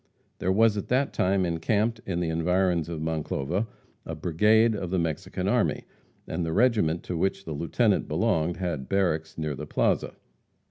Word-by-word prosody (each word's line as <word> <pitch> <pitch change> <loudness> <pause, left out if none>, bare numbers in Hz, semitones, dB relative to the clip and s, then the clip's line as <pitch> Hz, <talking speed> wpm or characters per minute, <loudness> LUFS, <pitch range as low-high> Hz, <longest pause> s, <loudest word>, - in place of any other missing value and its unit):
There 95 - 0
was 110 +1 +4
at 100 - -4
that 130 +3 +1
time 95 0 +2
encamped, 105 +7 0
in 90 -2 -1
the 85 - -1
environs 85 +1 +1
of 80 -2 -4
Monclova, 80 +4 -2 0.4
a 80 - -5
brigade 105 +8 +3
of 95 -4 -4
the 95 - 0
Mexican 80 -3 -2
army, - - +1 0.4
and 85 +2 -2
the 80 -1 -2
regiment 105 -7 +2
to 90 - -4
which 95 +3 -1
the 80 - -4
lieutenant 75 +2 +1
belonged 80 +2 0
had 85 -8 -3
barracks 85 -5 0
near 75 -2 -2
the 75 +2 -7
plaza. - - 0
90 Hz, 170 wpm, -27 LUFS, 80-100 Hz, 0.4 s, was